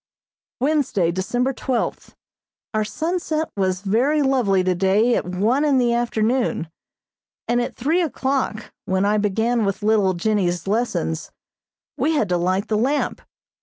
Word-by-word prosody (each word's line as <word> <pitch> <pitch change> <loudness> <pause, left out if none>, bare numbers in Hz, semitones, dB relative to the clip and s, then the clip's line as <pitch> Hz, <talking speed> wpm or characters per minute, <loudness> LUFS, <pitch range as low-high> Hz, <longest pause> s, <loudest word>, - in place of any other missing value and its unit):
] - - -77
Wednesday, 260 - +1
December 245 +9 -1
twelfth: 250 -1 -3 0.6
Our 215 0 +1
sunset 320 +5 -2
was 185 -2 0
very 250 +10 +2
lovely 235 -9 +2
today 190 +6 +2
at - - -1
one 215 +10 +1
in 290 -3 +3
the 240 -2 +2
afternoon, 235 -6 0 0.8
and 240 0 +2
at 240 - -4
three 315 +9 +1
o'clock, 265 -8 -2
when 190 +1 +1
I 210 +1 +2
began 225 +3 +1
with 200 0 -2
little 210 -3 +3
Jennie's 180 -2 0
lessons, 200 - -1 0.7
we 295 +6 +2
had 220 -10 +1
to 180 - +2
light 185 +4 0
the 215 -1 0
lamp. 280 +5 0
220 Hz, 140 wpm, -22 LUFS, 190-260 Hz, 0.8 s, in